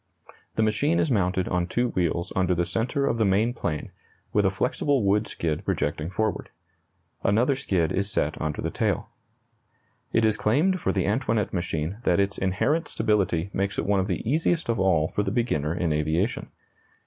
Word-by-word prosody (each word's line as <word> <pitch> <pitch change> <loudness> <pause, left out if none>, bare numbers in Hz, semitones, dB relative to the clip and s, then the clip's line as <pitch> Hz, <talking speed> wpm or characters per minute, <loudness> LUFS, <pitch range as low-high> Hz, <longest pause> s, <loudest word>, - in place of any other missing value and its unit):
The 110 - +2
machine 140 +10 +2
is 150 - +1
mounted 95 -4 +1
on 90 0 0
two 120 +6 0
wheels 85 -3 -1
under 90 -1 +2
the 85 0 +1
centre 115 +9 -1
of 115 - 0
the - - +4
main 105 +4 +2
plane, 80 - -3 0.4
with 105 -1 +3
a - - +4
flexible 125 +6 0
wood 105 +2 +2
skid 80 -2 -2
projecting 75 +2 -1
forward. 110 +2 -2 0.7
Another 120 +7 +3
skid 95 - 0
is 100 +1 0
set 75 -6 -1
under 80 -1 -2
the - - -2
tail. - - -1 1.0
It 115 0 +3
is 110 -1 +2
claimed 155 - +2
for - - +1
the 95 - 0
Antoinette 110 -1 0
machine 85 0 -2
that 90 -7 +2
its 100 0 0
inherent 100 - +1
stability 100 -4 0
makes 100 0 -1
it - - -1
one 100 0 +2
of 95 - 0
the - - -3
easiest 160 +2 +1
of 115 -3 +1
all 85 -5 +3
for 105 - -1
the 100 - -1
beginner 100 - 0
in 85 -3 0
aviation. 80 +8 -1
100 Hz, 185 wpm, -25 LUFS, 90-115 Hz, 1.0 s, the